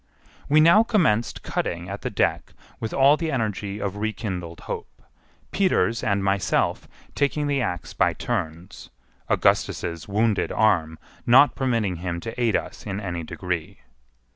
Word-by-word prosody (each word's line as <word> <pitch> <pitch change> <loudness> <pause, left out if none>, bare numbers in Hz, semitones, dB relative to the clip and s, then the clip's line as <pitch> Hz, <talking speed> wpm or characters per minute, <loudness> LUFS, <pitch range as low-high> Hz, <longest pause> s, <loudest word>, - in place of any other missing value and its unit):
We 150 +2 +5
now 170 +7 +7
commenced 160 - +1
cutting 85 +1 -3
at 100 +2 -6
the - - -3
deck - - -1 0.3
with 110 - -4
all 140 +2 +5
the 165 -1 -2
energy 105 -5 -2
of 100 0 -3
rekindled 95 -6 -4
hope, - - -7 0.5
Peters 150 - +1
and 100 -2 +1
myself 95 -1 0 0.3
taking 145 +1 0
the 140 -2 0
axe 90 -7 -3
by - - +2
turns, 90 -5 -5 0.4
Augustus's 85 -2 0
wounded 105 +1 +1
arm 80 -7 +2 0.3
not 130 +5 +7
permitting 115 -9 0
him 85 0 -4
to 115 +4 -6
aid 115 -4 +2
us - - -4
in 100 0 -3
any 90 -4 -4
degree. 85 0 -5
105 Hz, 140 wpm, -24 LUFS, 90-125 Hz, 0.5 s, now